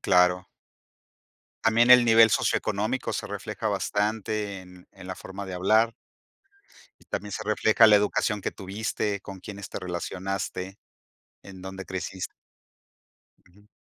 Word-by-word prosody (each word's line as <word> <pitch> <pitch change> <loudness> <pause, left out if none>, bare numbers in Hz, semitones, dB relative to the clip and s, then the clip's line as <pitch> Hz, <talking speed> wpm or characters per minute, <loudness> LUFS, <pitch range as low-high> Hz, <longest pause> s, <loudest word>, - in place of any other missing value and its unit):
Claro. 90 0 +3 1.2
También 115 +2 +4
el 125 -1 +9
nivel 115 -1 +7
socioeconómico 110 +6 0
se - - -3
refleja 105 +2 -4
bastante 105 0 -1
en 90 -1 -15
en 95 -1 -12
la 95 - -5
forma 95 +1 -8
de 95 - -6
hablar. 110 +5 +3 1.1
Y - - -21
también 105 -1 -5
se 110 - -4
refleja 110 +1 +4
la 105 -1 +7
educación 105 +1 0
que - - -2
tuviste, 100 +1 -3
con 95 -1 -10
quiénes 100 0 -8
te - - -5
relacionaste, 95 +1 -4 0.7
en 95 -2 -11
dónde 95 0 -7
creciste 95 0 -5 1.1
Ujú. 100 +4 -23
100 Hz, 130 wpm, -26 LUFS, 95-110 Hz, 1.2 s, el